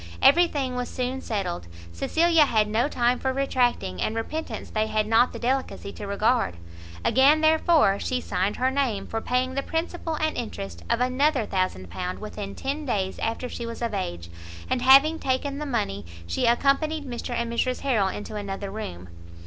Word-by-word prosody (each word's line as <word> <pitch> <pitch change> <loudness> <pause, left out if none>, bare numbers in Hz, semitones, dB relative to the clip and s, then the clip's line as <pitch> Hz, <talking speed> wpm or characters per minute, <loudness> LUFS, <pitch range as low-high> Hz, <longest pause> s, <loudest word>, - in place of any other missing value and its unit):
Every 345 - +6
thing 270 -5 -2
was 250 0 -3
soon 255 +1 -3
settled, 185 - -3 0.2
Cecilia 320 - +3
had 215 -5 +2
no 220 +5 +1
time 245 -3 +1
for 265 - 0
retracting, 250 - 0
and 220 - -1
repentance 310 +8 -4
they 215 0 0
had 215 -1 0
not 225 +3 +4
the - - -7
delicacy 255 -5 -2
to 205 - -7
regard; 215 - +1 0.5
again, 285 +4 +5
therefore, 315 - +4
she 255 - -1
signed 195 -3 -1
her 260 +1 +1
name 255 -8 0
for 225 - -3
paying 255 +2 0
the 275 - 0
principal 325 +1 -3
and 310 0 -1
interest 95 - -6
of - - +1
another 255 0 +2
1000l. 180 - -2
within 210 -2 -7
ten 280 +3 -3
days 195 -8 -2
after 230 +3 -2
she 235 -1 -6
was 230 +1 -6
of 230 -2 -2
age; 85 - -4 0.4
and 255 - +1
having 275 +5 +6
taken 275 +2 -1
the 300 - -4
money, 205 - -2 0.2
she 85 - 0
accompanied 285 +5 +2
Mr 245 -1 -4
and 235 0 -2
Mrs 255 +2 0
Harrel 230 -8 +2
into 210 +2 -5
another 200 -1 -4
room. 90 - -6
245 Hz, 175 wpm, -25 LUFS, 205-275 Hz, 0.5 s, Every